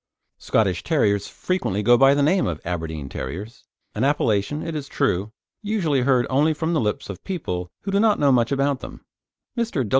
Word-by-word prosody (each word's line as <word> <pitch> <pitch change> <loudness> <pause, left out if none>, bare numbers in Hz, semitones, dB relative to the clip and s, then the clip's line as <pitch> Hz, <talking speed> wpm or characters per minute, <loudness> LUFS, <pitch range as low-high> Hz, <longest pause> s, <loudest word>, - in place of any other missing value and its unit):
Scottish 95 -6 +1
Terriers 100 - +1
frequently 145 - -2
go 120 +3 +6
by 135 +2 +5
the 145 - +2
name 180 +6 +2
of 80 -3 -3
Aberdeen 80 -4 -4
Terriers 90 - -7 0.3
an 110 - -2
appellation, 135 -1 +1
it 165 - -4
is 145 -3 -4
true, 105 -9 -1 0.3
usually 190 - 0
heard 125 -1 +3
only 150 +4 +2
from 160 +2 -1
the 155 - +2
lips 105 -2 -2
of 100 - -8
people 90 - -4
who 195 - -4
do 200 - +2
not 215 -1 +4
know 140 -1 +3
much 120 -1 +2
about 140 -1 +1
them. - - -10 0.5
Mr. 225 - -1
135 Hz, 185 wpm, -23 LUFS, 100-155 Hz, 0.5 s, go